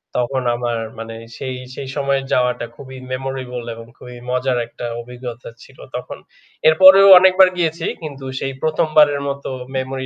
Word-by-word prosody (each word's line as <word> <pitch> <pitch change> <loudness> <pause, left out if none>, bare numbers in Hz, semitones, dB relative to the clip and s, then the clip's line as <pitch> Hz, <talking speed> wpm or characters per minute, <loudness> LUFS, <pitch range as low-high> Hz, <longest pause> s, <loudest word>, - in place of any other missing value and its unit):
তখন 130 +2 -1
আমার 120 -1 -2 0.2
মানে 115 0 -7 0.2
সেই 130 -1 -5 0.2
সেই 135 - -7
সময়ের 140 -1 0
যাওয়াটা 125 -1 +1
খুবই 130 +1 -11
মেমোরেবল 130 -2 -5
এবং 115 0 -11
খুবই 125 0 -11
মজার 125 0 0
একটা 120 - -8 0.2
অভিজ্ঞতা 120 0 -9
ছিল - - -18 0.2
তখন। - - -6 0.5
এরপরেও 190 +5 +8
অনেকবার 185 0 +6
গিয়েছি 165 -1 -1 0.2
কিন্তু 140 -4 -8
সেই 135 0 -3
১ম 155 0 0
বারের 145 -2 +5
মত 140 0 -4 0.3
মেমোরি 130 0 -3
135 Hz, 150 wpm, -19 LUFS, 125-150 Hz, 0.5 s, এরপরেও